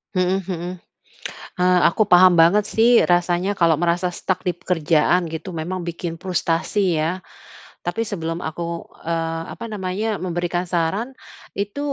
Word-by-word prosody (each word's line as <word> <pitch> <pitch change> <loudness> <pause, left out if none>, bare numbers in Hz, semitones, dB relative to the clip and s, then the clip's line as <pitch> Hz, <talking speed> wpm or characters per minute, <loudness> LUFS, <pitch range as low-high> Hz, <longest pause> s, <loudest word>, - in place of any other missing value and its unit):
Mhm 185 +1 +2
mhm, 175 -1 -4 0.9
eee, 180 0 +4
aku 220 - +1
paham 180 0 +7
banget 195 +5 +5
sih 225 +1 +3 0.2
rasanya 175 +3 +1
kalau 165 -2 +3
merasa 175 +1 +1
stuck 185 +1 -3
di 180 - +1
pekerjaan 175 0 +1
gitu 160 +3 -6
memang 185 +3 -4
bikin 170 -1 -5
frustrasi 180 0 0
ya, 175 +4 -2 0.6
tapi 225 +7 -2
sebelum 165 -6 -4
aku, 170 +1 -4 0.2
eee, 165 -1 -1
apa - - -7
namanya 205 +2 -2
memberikan 175 0 -2
saran, 190 +10 -1 0.4
itu 200 +6 -4
175 Hz, 135 wpm, -21 LUFS, 170-190 Hz, 0.9 s, paham